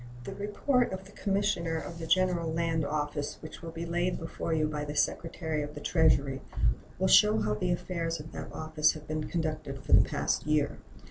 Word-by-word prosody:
The - - -6
report 235 +5 +1
of 190 0 -5
the 195 - -14
Commissioner 195 -5 0
of 165 +1 -6
the 165 - -5
General 180 -3 +2
Land 165 -1 0
Office, 145 -1 -2
which 155 - -9
will 165 - -6
be 165 +1 -5
laid 175 +2 0
before 165 0 -4
you 155 -1 +2
by 150 -1 -3
the 145 0 -5
Secretary 160 +1 -1
of 150 +1 -6
the - - -5
Treasury, 145 -4 +2 0.6
will - - +2
show 105 +1 +7
how 110 -1 +1
the 140 +12 -1
affairs 170 -2 -2
of 150 +1 -9
that - - -7
office 155 -1 +2
have 155 -2 -10
been 155 0 -2
conducted 155 -5 -3
for - - +1
the - - +9
past - - -1
year. 150 -1 +1
160 Hz, 200 wpm, -30 LUFS, 150-170 Hz, 0.6 s, the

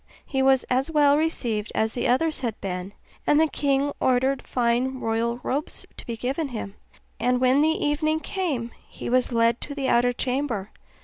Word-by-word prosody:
He 265 -2 -1
was 265 -1 +4
as 260 +4 0
well 290 -2 +4
received 240 -9 -1
as 220 0 +1
the 250 - 0
others 300 +6 +1
had 235 -4 -3
been, 185 0 -5 0.3
and 295 - +5
the 320 - +5
king 285 -2 0
ordered 260 +1 +2
fine 250 +2 0
royal 230 +1 -1
robes 285 +3 -3
to - - -10
be 230 -1 -4
given 270 +7 -2
him; 220 -6 -6 0.5
and 250 +1 +2
when 260 +2 +4
the 310 - +4
evening 310 0 0
came 305 - -3 0.2
he - - -6
was 255 0 +2
led 230 0 +2
to 285 - -5
the 270 -2 -1
outer 245 +1 +4
chamber. 250 -5 -2
255 Hz, 180 wpm, -25 LUFS, 235-290 Hz, 0.5 s, and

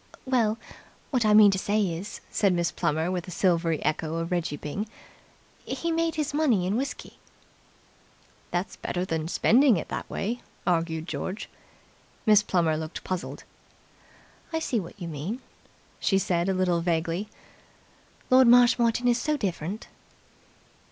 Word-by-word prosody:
"Well, 235 -4 +2 0.5
what 250 -5 +2
I 210 0 +5
mean 210 -1 +8
to 190 - 0
say 205 +2 0
is," 180 +5 -7
said 200 -3 +2
Miss 175 0 0
Plummer, 160 +1 0
with 180 -1 -3
a - - -6
silvery 170 -3 +1
echo 155 +1 -1
of 165 +1 -3
Reggie 170 -4 -1
Byng, 175 +10 -4 0.8
"he 335 - -3
made 330 0 0
his 305 -2 -2
money 265 -12 +2
in 190 +3 0
whisky." 270 +4 -4 1.3
"That's 180 +4 -3
better 180 +1 -3
than 160 -3 -2
spending 240 - +4
it 160 - -5
that - - -5
way," 235 +5 -3 0.2
argued 165 -2 0
George. 190 +4 -4 0.8
Miss 210 -2 +6
Plummer 170 -6 +1
looked 155 +1 -6
puzzled. 185 -1 -4 1.1
"I 325 - -1
see 265 -7 0
what 180 +2 -9
you 175 - -5
mean," 165 - -4 0.6
she 195 - +2
said 175 -1 0
a - - +2
little 180 -2 +1
vaguely. 170 +3 -1 1.0
"Lord 255 -1 +7
Marshmoreton 240 0 +5
is 240 0 +3
so 305 -1 0
different." 190 - -3
190 Hz, 145 wpm, -27 LUFS, 170-235 Hz, 1.3 s, mean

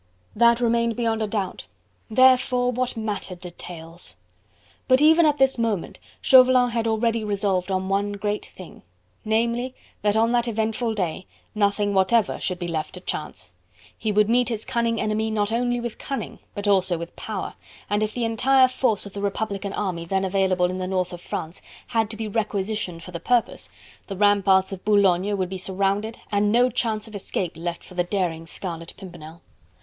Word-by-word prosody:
That 235 +1 +5
remained 235 -1 +1
beyond 225 -1 0
a 215 - 0
doubt! 200 -3 -3 0.4
Therefore 250 +1 +4
what 250 -1 -2
mattered 205 -4 -4
details? 175 -1 -8 0.7
But 255 0 +5
even 320 +2 +6
at 295 -1 +2
this 265 -2 +3
moment, 220 -6 -2 0.2
Chauvelin 255 -1 +6
had 230 -1 -1
already 225 0 +1
resolved 200 -3 0
on 190 0 -1
one 200 +1 0
great 205 +1 -2
thing: 185 - -13 0.4
namely, 235 +3 0 0.3
that 205 0 +2
on 225 +1 +3
that 240 0 +2
eventful 225 +1 -1
day, 185 -2 -3 0.3
nothing 205 -1 +1
whatever 195 +2 +2
should 185 - -2
be 175 -1 -4
left 160 0 -3
to - - -7
Chance; 150 - -5 0.4
he 215 - -2
would 210 0 +3
meet 240 +1 +3
his 225 -2 -3
cunning 235 -3 0
enemy 215 +1 0
not 210 -1 0
only 245 +1 0
with 240 -1 -5
cunning, 275 - -5 0.2
but 205 0 -3
also 190 -3 +3
with 170 +1 -8
power, 210 -4 -5 0.3
and 205 +1 0
if 215 0 -1
the 240 -2 0
entire 255 +4 +4
force 250 -5 0
of 200 - -10
the 200 - -5
republican 200 0 -2
army 185 -5 -2
then 190 +3 0
available 190 -1 +2
in 185 - -4
the 185 - -2
north 185 -1 -1
of 175 - -8
France 160 0 -5 0.3
had 225 -3 +1
to 215 - -6
be 220 0 -3
requisitioned 205 -4 -2
for 180 - -10
the 170 - -5
purpose, 245 +3 0 0.4
the 195 - -6
ramparts 195 -2 +4
of 185 - -8
Boulogne 200 -1 +3
would 185 -2 -1
be 190 0 -5
surrounded 195 +4 -1
and 205 0 +2
no 245 +2 +4
chance 220 -2 -1
of 220 - -13
escape 190 -3 -3
left 170 +1 -5
for - - -14
the 175 -1 +1
daring 175 -3 -2
Scarlet 165 -2 -7
Pimpernel. 170 -4 -11
205 Hz, 180 wpm, -24 LUFS, 185-230 Hz, 0.7 s, even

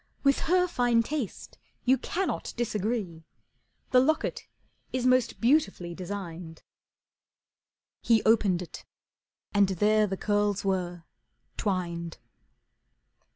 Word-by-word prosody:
With 275 -1 +4
her 360 0 +4
fine 245 -7 +2
taste 275 -4 -5 0.3
you 255 +1 +5
cannot 350 - -3
disagree, 210 -7 -2 0.7
The 255 - +6
locket 310 +5 0 0.4
is 255 -1 -2
most 255 -1 +2
beautifully 225 - +1
designed." 175 -3 -7 1.4
He 225 -2 +3
opened 200 -5 +3
it 175 - -10 0.7
and 205 -1 +4
there 210 +3 +3
the 195 -1 -3
curls 205 -1 0
were, 180 -3 -2 0.5
twined. 170 -4 -3
210 Hz, 100 wpm, -28 LUFS, 180-245 Hz, 1.4 s, The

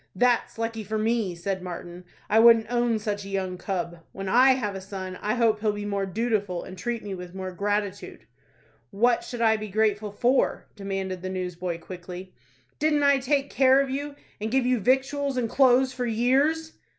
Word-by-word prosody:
"That's 240 +3 +2
lucky 225 -1 -3
for 215 +2 -3
me," 220 -4 0
said 185 +2 -3
Martin; 175 0 -8 0.2
"I 220 - +4
wouldn't 230 0 +6
own 240 -2 +2
such 205 -1 -3
a 195 - -9
young 190 -2 -2
cub. 175 -4 -3
When 195 0 -6
I 255 +6 +6
have 210 -6 -2
a 195 - -6
son, 185 -1 -7
I 210 +3 0
hope 225 -3 +2
he'll 210 -1 +1
be 205 0 -5
more 200 -1 -1
dootiful, 205 -3 -1
and 185 - -9
treat 230 +5 -4
me 205 -2 -5
with 180 0 -8
more 185 -1 -5
gratitude." 205 +1 -3 0.6
"What 235 +4 +2
should 240 -1 -6
I 220 -1 +4
be 215 0 -6
grateful 210 0 0
for?" 245 +6 +1
demanded 195 -2 -4
the 185 - -4
newsboy, 180 -2 -4
quickly. 180 +1 -9 0.5
"Didn't 300 -1 +2
I 280 -1 +5
take 275 +1 0
care 265 0 +5
of 275 -1 0
you, 285 +1 -4 0.2
and 215 +1 -3
give 260 +1 +1
you 250 -1 +2
victuals 270 +4 +1
and 240 -2 0
clothes 260 +1 +4
for 250 -1 -2
years?" 275 +8 +1
215 Hz, 190 wpm, -26 LUFS, 190-245 Hz, 0.6 s, wouldn't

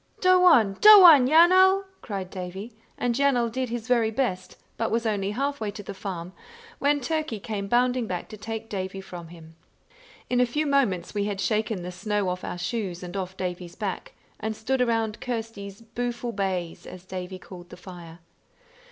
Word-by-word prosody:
"Doe 370 -1 +5
on, 225 - +5
doe 425 -2 +10
on, 290 -7 +8
Yanal!" 370 +5 +6 0.2
cried 195 -3 -6
Davie; 190 +5 -7 0.2
and 245 -1 0
Yanal 250 -3 +2
did 255 +1 -3
his 235 -1 -5
very 235 -3 +2
best, 215 -7 -3 0.2
but 225 - -1
was 230 +1 -1
only 200 -3 -1
halfway 260 -1 -2
to 205 0 -8
the 200 - -7
farm, 185 -2 -6 0.5
when 290 +1 +2
Turkey 305 -4 -2
came 200 -1 -4
bounding 245 +1 +1
back 180 -3 -4
to 215 - -8
take 225 +1 -6
Davie 195 -2 -5
from 175 -3 -9
him. 165 -1 -14 0.7
In 250 0 +1
a - - +5
few 300 +6 -1
moments 250 - 0
we 205 -1 -1
had 205 -2 -3
shaken 215 -3 -1
the 180 - -5
snow 205 +1 -2
off 180 0 -4
our - - -5
shoes 185 -2 -4
and 180 +1 -8
off 190 -1 -5
Davie's 180 -1 -5
back, 200 -4 -5 0.3
and 220 +1 -3
stood 255 +4 -1
around 225 -3 0
Kirsty's 225 -4 -5
"booful 240 +1 -4
baze", 185 -4 -3
as 185 0 -11
Davie 185 0 -6
called 180 -1 -12
the - - -11
fire. 175 -2 -12
215 Hz, 180 wpm, -25 LUFS, 185-245 Hz, 0.7 s, doe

